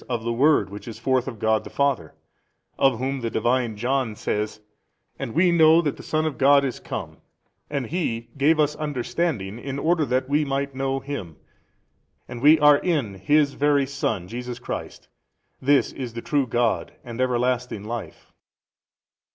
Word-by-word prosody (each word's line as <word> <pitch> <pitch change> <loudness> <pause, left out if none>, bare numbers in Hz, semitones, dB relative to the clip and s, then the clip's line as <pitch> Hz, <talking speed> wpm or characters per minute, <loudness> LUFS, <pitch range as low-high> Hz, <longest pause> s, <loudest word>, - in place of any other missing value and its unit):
of 120 -3 -2
the 115 0 -1
Word 140 -4 +3
which 105 +3 -9
is 115 - -7
forth 130 +2 0
of 120 -4 -5
God 110 0 +1
the - - -9
Father, 140 -2 -1 0.6
of 135 -4 +4
Whom 135 +2 -2
the 115 - -2
Divine 120 -2 0
John 125 0 -1
says, 105 +1 -3 0.6
And 115 - -5
we 175 +2 +4
know 160 -1 +6
that 155 -4 0
the - - -11
Son 155 0 -1
of 150 -5 -3
God 140 0 +5
is 130 - -3
come - - -6 0.5
and 140 -3 -2
He 115 -7 -3
gave 150 +3 +3
us 150 0 +2
understanding 135 - -2
in 135 +2 -5
order 160 +3 +2
that 130 +1 0
we 145 +2 +2
might 140 0 -2
know 135 0 -2
Him 130 - -6 0.9
and 120 -1 -8
we 150 +3 +7
are 150 -1 +7
in 145 - -1
His 140 +9 +2
Very 145 -1 +2
Son 135 -7 -2
76 90 - -13
Jesus 125 0 -5
Christ: 120 - -7 0.5
this 140 +1 +3
is 125 -4 -6
the 115 - -6
true 140 -3 +1
God 120 -1 0
and 120 +1 -5
Everlasting 125 -3 0
Life? 115 +1 -7
130 Hz, 175 wpm, -24 LUFS, 115-145 Hz, 0.9 s, we